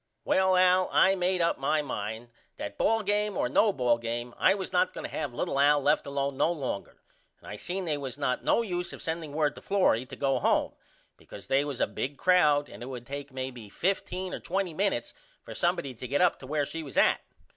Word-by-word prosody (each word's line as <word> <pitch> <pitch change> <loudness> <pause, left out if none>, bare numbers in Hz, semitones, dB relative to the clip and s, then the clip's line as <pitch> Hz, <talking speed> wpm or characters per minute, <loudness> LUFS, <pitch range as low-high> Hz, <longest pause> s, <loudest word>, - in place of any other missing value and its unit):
Well 190 0 +3
Al 185 0 +4
I 190 - +5
made 185 -1 0
up 170 - +1
my 150 +3 +1
mind 110 -1 -5 0.3
that 100 0 -6
ball 225 -1 +2
game 205 0 0
or - - +1
no 205 - +3
ball 125 -8 +1
game 120 +1 -4
I - - +4
was 190 -2 -5
not 180 0 +2
going - - -6
to - - -6
have 140 - -2
little 135 +3 -2
Al 145 +1 +5
left 145 +1 +1
alone 140 0 -2
no 165 - +3
longer 135 -11 -5 0.3
and - - -17
I 105 - -6
seen 185 - -4
they 150 -3 -1
was 135 -1 -5
not 140 -3 -1
no 235 - +3
use 180 -4 -3
of - - -9
sending 160 -3 -3
word 150 -1 +1
to - - -12
Florrie 185 - +2
to - - -9
go 135 -1 +1
home - - +1 0.4
because - - -11
they 135 +1 +2
was 145 -4 -5
a - - +3
big 140 +2 -4
crowd 150 -6 +4
and 100 - -12
it 120 - -6
would 125 -2 -7
take 140 +1 -7
maybe 130 -4 -6
15 185 - -2
or - - -4
20 185 -1 -2
minutes 190 - -1 0.3
for - - -9
somebody 135 -2 0
to 125 +2 -8
get 140 +3 0
up 180 -1 +3
to 130 - -10
where 145 0 0
she 165 +3 -6
was 140 -4 -9
at. - - +4
145 Hz, 230 wpm, -28 LUFS, 130-180 Hz, 0.4 s, I